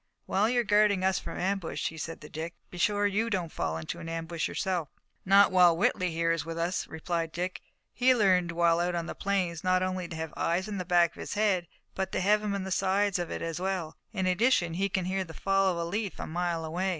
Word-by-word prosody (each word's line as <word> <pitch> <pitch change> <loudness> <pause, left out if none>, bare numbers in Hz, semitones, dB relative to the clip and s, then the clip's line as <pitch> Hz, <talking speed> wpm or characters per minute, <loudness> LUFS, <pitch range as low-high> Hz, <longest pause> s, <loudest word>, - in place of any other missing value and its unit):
"While 205 +4 +2
you 245 0 +3
are - - -3
guarding 205 -3 +3
us 190 -1 +2
from - - -7
ambush," 190 -2 -1
he 160 - -11
said 165 +1 -6
to 150 - -9
Dick, 165 +2 -6 0.2
"be 180 - -8
sure 205 +3 +2
you 210 +3 +1
don't 180 -6 -2
fall 80 -1 -2
into 80 -1 -5
an 165 - -7
ambush 165 0 -3
yourself." 175 -6 -2 0.4
"Not 195 +1 +6
while 180 -3 +6
Whitley, 180 +1 +1
here, 165 0 0
is 165 - 0
with 165 0 -6
us," 170 +2 -1
replied 165 0 -3
Dick. 180 +2 -4 0.3
"He 255 0 +4
learned 185 -6 +3
while 170 0 +3
out 175 0 0
on 170 -1 -2
the - - -5
plains, 185 -5 -1
not 185 0 +2
only 185 -1 -2
to 165 - -7
have 160 -1 -5
eyes 175 +4 0
in 205 -2 -4
the 180 - -3
back 175 -1 +4
of - - -17
his - - -5
head, 200 -5 +1 0.3
but 190 0 -3
to - - +1
have 210 +3 +3
'em 210 -1 -2
in 195 - -3
the 190 - -5
sides 195 +1 +1
of 175 - -3
it - - -4
as 165 0 -3
well. 185 -4 -2 0.2
In 190 -4 -2
addition 185 -2 +2
he 195 +3 0
can 185 -1 -1
hear 190 +1 -1
the 165 -3 -11
fall 195 0 +2
of 175 - -3
a 170 - -1
leaf 205 +3 -3
a - - -3
mile 170 -1 -2
away." 180 +4 -1
180 Hz, 250 wpm, -29 LUFS, 165-195 Hz, 0.4 s, Not